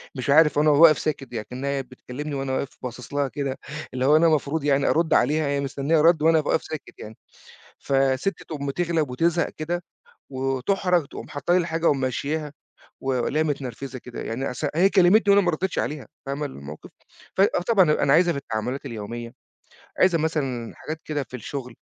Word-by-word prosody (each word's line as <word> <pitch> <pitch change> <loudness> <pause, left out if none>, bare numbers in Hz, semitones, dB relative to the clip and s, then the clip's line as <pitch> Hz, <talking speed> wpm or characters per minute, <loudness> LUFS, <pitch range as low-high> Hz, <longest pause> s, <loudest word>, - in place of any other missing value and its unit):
مش 130 +1 -4
عارف 150 0 +5
أنا 155 +1 +4
و 145 +1 +4
واقف 155 -3 +7
ساكِت 135 -5 -3
يعني 110 -2 -4
كإنّها 130 +3 -4
هي 135 - -2
بتكلّمني 130 +3 -7
وأنا 135 -1 -2
واقِف 140 +1 -3
باصِص 125 +1 -7
لها 145 -1 +1
كده 135 0 -4 0.4
اللي 130 0 -1
هو 150 - +5
أنا 165 +2 +5
مفروض 155 0 0
يعني 140 -1 +2
أرُد 165 -1 +2
عليها، 155 0 +2
هي 140 0 0
مستنيّة 140 +3 0
رَد 165 0 +5
وأنا 160 +1 +5
أبقى 150 - -1
واقف - - +1
ساكت 155 - -8
يعني. 110 +1 -10 0.6
فالسِت 135 +6 0
تقوم 140 -3 -5
تِغلَب 165 -2 0
وتِزهَق 165 +6 +1
كده 175 +3 -4 0.5
وتُحرَج 140 +6 0
تقوم - - -9
حاطّة 145 +4 -1
لي - - +5
الحاجة 165 -1 0
وممشّياها 140 +3 -1 0.5
والاقيها 135 +4 0
متنرفِزة 130 -2 -5
كده، 125 0 -8
يعني 125 +4 -3
أص 125 +5 -4
هي 185 +4 +5
كلّمتني 200 +2 +5
وأنا 200 - +6
ما 175 - +3
ردّيتش 180 +4 -2
عليها، 150 -2 -3 0.2
فاهمة 140 +2 -3
الموقف؟ 75 - -9 0.5
ف - - +4
آه 195 -2 +3
طبعًا، 190 -9 +5
أنا 140 -2 +3
عايزها 175 +2 +5
في 140 - -3
التعامُلات 125 +2 -4
اليومية، 115 0 -6 0.7
عايزها 180 -3 +4
مثلًا 135 -7 -2
حاجات 155 +1 -7
كده 150 -2 -2
في 125 - -7
الشُغل. 125 0 -6
145 Hz, 185 wpm, -24 LUFS, 130-160 Hz, 0.7 s, واقف